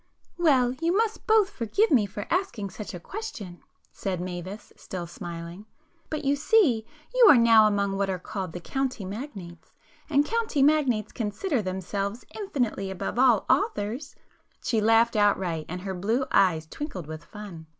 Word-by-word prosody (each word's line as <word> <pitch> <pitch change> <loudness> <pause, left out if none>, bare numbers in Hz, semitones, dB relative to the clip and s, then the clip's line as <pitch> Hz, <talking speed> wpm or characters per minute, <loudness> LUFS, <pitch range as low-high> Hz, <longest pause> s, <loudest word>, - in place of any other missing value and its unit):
"Well, 260 -7 +4
you 340 +3 +2
must 445 -1 -1
both 435 -2 +4
forgive 400 - +1
me 230 -8 +4
for 205 +1 -6
asking 335 - -1
such 200 +1 -7
a - - -6
question"—said 195 - -7
Mavis 180 +3 -6
still 180 -2 -6
smiling—"But 205 - -9
you 280 +1 +3
see 285 - +3 0.3
you - - +7
are 280 - +9
now 230 -2 +6
among 200 -1 0
what 195 0 0
are 185 - -1
called 185 -1 -6
the 175 - -5
'county 260 0 -3
magnates,' 195 - -8 0.4
and 290 -1 +3
county 445 -9 0
magnates 270 -8 +2
consider 235 - -2
themselves 195 +3 -4
infinitely 250 - -2
above 195 +4 -4
all 245 -6 +4
authors!" 285 - 0 0.5
She 225 -3 +1
laughed 225 +2 +4
outright, 190 -6 +1
and 180 +2 -5
her 190 0 -4
blue 220 +8 0
eyes 175 -5 +3
twinkled 190 - -6
with 155 +1 -8
fun. 185 -6 -10
215 Hz, 150 wpm, -26 LUFS, 190-285 Hz, 0.5 s, are